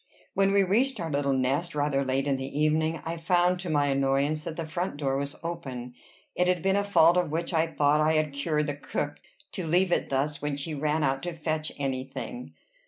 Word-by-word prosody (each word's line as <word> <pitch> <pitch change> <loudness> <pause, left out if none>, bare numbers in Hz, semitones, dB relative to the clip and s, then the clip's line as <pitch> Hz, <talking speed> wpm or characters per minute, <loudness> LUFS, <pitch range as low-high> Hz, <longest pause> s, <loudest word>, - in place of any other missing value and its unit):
When 195 0 +3
we 200 0 +4
reached 230 +6 +1
our 165 -2 -3
little 140 -1 +1
nest, 135 +6 0
rather 145 -1 +1
late 135 +1 0
in 140 -1 +1
the 135 +2 -4
evening, 155 +1 +2
I 165 +1 -3
found 175 +2 +2
to 180 -1 -5
my 145 -2 +2
annoyance 140 +2 +1
that 160 - -4
the 165 - -3
front 170 +1 -3
door 135 -2 0
was 140 +1 -3
open. 130 -8 -5 0.4
It 180 - +1
had 180 -2 +1
been 195 0 +3
a 200 - +2
fault 175 -4 +5
of 175 -3 +1
which 165 +3 -2
I 165 0 +3
thought 150 -1 +2
I 155 +1 +3
had 155 -2 +1
cured 150 +1 0
the 145 -1 -3
cook, 145 +1 -3 0.3
to 180 -4 -4
leave 180 +3 +3
it - - +1
thus 140 +2 -1
when 145 -1 -2
she 155 +3 -3
ran 150 +1 0
out 135 -1 +1
to 175 0 -4
fetch 155 -1 -2
any 135 -2 -2
thing. 245 - -7
155 Hz, 225 wpm, -27 LUFS, 140-170 Hz, 0.4 s, fault